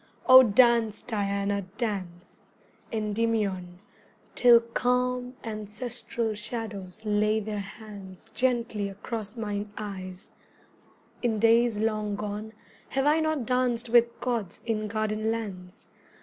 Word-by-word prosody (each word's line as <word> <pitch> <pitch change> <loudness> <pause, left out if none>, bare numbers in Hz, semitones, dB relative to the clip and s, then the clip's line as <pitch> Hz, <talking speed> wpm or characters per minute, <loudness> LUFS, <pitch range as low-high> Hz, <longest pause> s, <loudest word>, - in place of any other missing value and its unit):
O 255 0 +10
dance, 235 -2 +4
Diana, 200 -2 -1 0.2
dance, 185 -6 -5 0.4
Endymion, 210 -4 -1 0.6
Till 240 -1 +7
calm 250 +2 -1
ancestral 220 +1 -4
shadows 210 -2 -6
lay 210 +1 +2
their 210 -1 -4
hands 200 -2 -10
Gently 235 -5 0
across 210 +2 -6
mine 205 -2 -3
eyes: 190 -3 -7 0.9
in 230 -3 +1
days 230 +1 +4
long 215 -1 0
gone 210 +1 -5 0.4
Have 270 0 0
I 300 +2 +4
not 315 -5 0
danced 250 -1 +1
with 235 0 +4
gods 230 -8 -2
in 215 -2 -1
garden 215 0 -1
lands? 195 -5 -5
215 Hz, 105 wpm, -27 LUFS, 205-235 Hz, 0.9 s, O